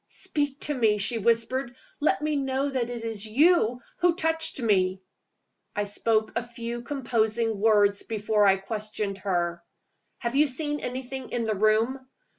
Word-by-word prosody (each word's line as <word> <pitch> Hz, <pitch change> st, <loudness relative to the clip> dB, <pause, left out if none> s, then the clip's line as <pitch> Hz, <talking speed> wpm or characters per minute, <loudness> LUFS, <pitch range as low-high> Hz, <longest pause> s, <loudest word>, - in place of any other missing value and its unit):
"Speak 290 Hz, -1 st, -2 dB
to 295 Hz, -, +1 dB
me!" 220 Hz, -6 st, +2 dB
she 225 Hz, +3 st, +1 dB
whispered. 235 Hz, +3 st, 0 dB, 0.2 s
"Let 295 Hz, -2 st, +1 dB
me 305 Hz, 0 st, 0 dB
know 275 Hz, 0 st, -1 dB
that 250 Hz, -3 st, -1 dB
it 240 Hz, -2 st, -5 dB
is 225 Hz, -3 st, -3 dB
you 250 Hz, 0 st, +3 dB, 0.2 s
who 350 Hz, -1 st, +3 dB
touched 320 Hz, -3 st, +1 dB
me." 190 Hz, -5 st, +2 dB, 0.8 s
I 205 Hz, -, 0 dB
spoke 215 Hz, +1 st, 0 dB
a 235 Hz, -, +1 dB
few 235 Hz, 0 st, -6 dB
composing 230 Hz, -4 st, -1 dB
words 205 Hz, -2 st, +4 dB
before 210 Hz, -1 st, +1 dB
I 195 Hz, -, +6 dB
questioned 205 Hz, 0 st, -4 dB
her. 175 Hz, -3 st, -1 dB, 0.6 s
"Have 235 Hz, 0 st, -3 dB
you 300 Hz, +2 st, +5 dB
seen 295 Hz, +2 st, -2 dB
anything 260 Hz, +1 st, -5 dB
in 240 Hz, -, -2 dB
the 220 Hz, -1 st, 0 dB
room?" 215 Hz, +5 st, +2 dB
230 Hz, 155 wpm, -26 LUFS, 215-265 Hz, 0.8 s, I